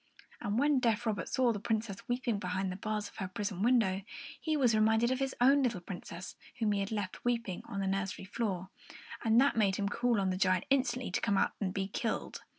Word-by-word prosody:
And 205 +2 -2
when 285 +1 +4
deaf 235 -1 +1
Robert 215 -3 -1
saw 250 -2 +2
the 205 - -4
Princess 220 -2 -2
weeping 245 -3 0
behind 185 0 -2
the - - -5
bars 210 +1 -3
of - - -15
her 190 - -3
prison 195 0 -4
window, 215 -5 +3 0.4
he 310 -1 0
was 250 -5 +4
reminded 220 +2 +3
of 260 - 0
his 270 -1 -1
own 275 +3 +6
little 235 -7 0
Princess 175 0 -8 0.2
whom 220 -3 +1
he 205 - +1
had 195 +1 -2
left 205 -4 -3
weeping 230 -6 -1
on 200 - -3
the - - -1
nursery 195 0 -2
floor; 190 -3 -3 0.5
and 225 +1 +5
that 275 +2 +4
made 200 -4 +3
him 200 0 -1
call 235 +2 +1
on 190 -1 +1
the 185 - -2
giant 185 -1 +2
instantly 255 -5 +1
to - - 0
come 200 - +2
out - - +3
and 190 -2 0
be 195 0 -2
killed. 220 +3 -3
210 Hz, 225 wpm, -32 LUFS, 195-240 Hz, 0.5 s, own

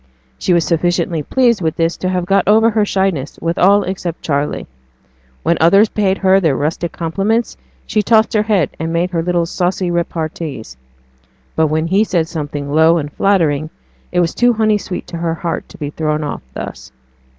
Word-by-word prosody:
She - - 0
was 170 -2 +3
sufficiently 170 -1 0
pleased 235 - +2
with 160 -1 -1
this 165 0 0
to 185 - -2
have 180 -1 -1
got 195 +2 +2
over 220 +2 +5
her 215 -1 +2
shyness 190 -8 -1
with 165 +1 -2
all 200 +2 +5
except 180 -3 -5
Charley. 145 -1 -1 0.8
When 170 - +2
others 195 +6 +5
paid 195 -2 0
her 190 0 +4
their 160 -7 +1
rustic 160 +4 -2
compliments 200 +8 -1 0.3
she 215 - 0
tossed 220 +2 +3
her 215 - +3
head, 205 -8 +1
and 165 +1 -2
made 170 +2 0
her 165 -2 0
little 175 0 0
saucy 180 +1 -1
repartees; 160 - -4 0.8
but 160 0 +3
when 155 +1 0
he 195 +5 +2
said 175 -7 0
something 145 -3 -5
low 160 +2 +5
and 145 -2 -4
flattering, 160 -6 +1 0.4
it 180 - +2
was 170 -1 0
too 245 0 +3
honey 215 -1 +2
sweet 180 - -6
to 170 - -7
her 165 -1 -1
heart 165 0 -4
to - - -13
be 145 -1 -5
thrown 155 0 -1
off 145 - -4
thus. 65 - -7
170 Hz, 185 wpm, -16 LUFS, 160-195 Hz, 0.8 s, over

